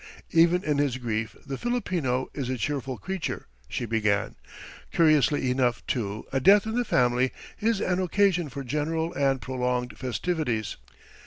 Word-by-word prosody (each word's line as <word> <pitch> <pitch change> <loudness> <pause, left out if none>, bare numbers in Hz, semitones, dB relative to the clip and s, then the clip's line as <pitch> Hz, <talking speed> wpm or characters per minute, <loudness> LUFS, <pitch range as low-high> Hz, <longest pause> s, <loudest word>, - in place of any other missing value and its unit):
"Even 170 +2 +4
in 150 -2 +1
his 140 -4 +1
grief 115 -3 -3
the 135 - -5
Filipino 175 - -1
is 135 -4 -3
a 130 - -1
cheerful 135 +2 -2
creature," 190 -2 -4 0.2
she 120 - -2
began; 105 -3 +1 0.6
"curiously 150 -5 +3
enough, 125 -2 +1
too, 105 -3 -2
a 135 - +2
death 200 +9 +6
in 220 - -3
the 245 +1 +1
family 125 - +2 0.3
is 220 -1 +1
an 185 -2 0
occasion 185 -3 +2
for 140 +1 -6
general 160 +5 -1
and 135 -2 +1
prolonged 125 -1 -1
festivities. 125 - -2
135 Hz, 150 wpm, -27 LUFS, 125-170 Hz, 0.6 s, death